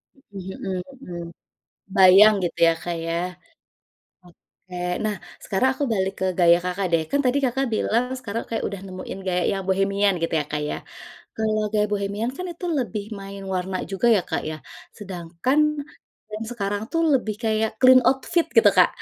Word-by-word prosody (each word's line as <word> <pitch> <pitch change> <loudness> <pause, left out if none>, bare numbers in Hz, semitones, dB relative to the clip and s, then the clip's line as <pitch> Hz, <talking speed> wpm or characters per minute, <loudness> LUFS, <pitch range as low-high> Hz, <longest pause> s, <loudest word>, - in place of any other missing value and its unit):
Mmm, 195 -8 -9
mhm 185 -2 -2 0.2
mhm. 175 -1 -7 0.8
Bayang 195 +3 +8
gitu 175 - -3
ya, 165 - +5
Kak, 175 -1 -3
ya? 165 - -2 1.1
Oke. 180 +1 -20 0.3
Nah, 210 -1 0 0.3
sekarang 205 +7 +1
aku 290 - -2
balik 190 -1 0
ke 190 - 0
gaya 170 0 +6
Kakak 180 +2 -2
deh, 160 -1 +3
kan 285 - +2
tadi 250 +3 +3
Kakak 265 +2 +1
bilang 230 +2 +1 0.2
sekarang 230 -1 -4
kayak 225 - -2
udah 200 -2 -6
nemuin 185 +1 -7
gaya 180 -1 +1
yang 195 -1 -2
bohemian 195 +1 +2
gitu 165 - -1
ya, 145 - -3
Kak, 150 0 -1
ya? - - -2 0.6
Kalau 215 -1 0
gaya 210 0 +2
bohemian 205 +4 -1
kan 365 - -5
itu 345 - -10
lebih 210 -4 -3 0.2
main 195 0 -8
warna 185 +1 -2
juga 195 +5 0
ya, - - +2
Kak, - - -2
ya. 155 - -5 0.4
Sedangkan 185 - -2 0.7
brand 215 +1 -6
sekarang 205 -2 -2
tuh 330 0 +1
lebih 220 -5 0
kayak 220 0 +1
clean 255 0 +8
outfit 300 +6 +1
gitu, 460 - +7
Kak. - - +7
200 Hz, 170 wpm, -23 LUFS, 185-225 Hz, 1.1 s, Bayang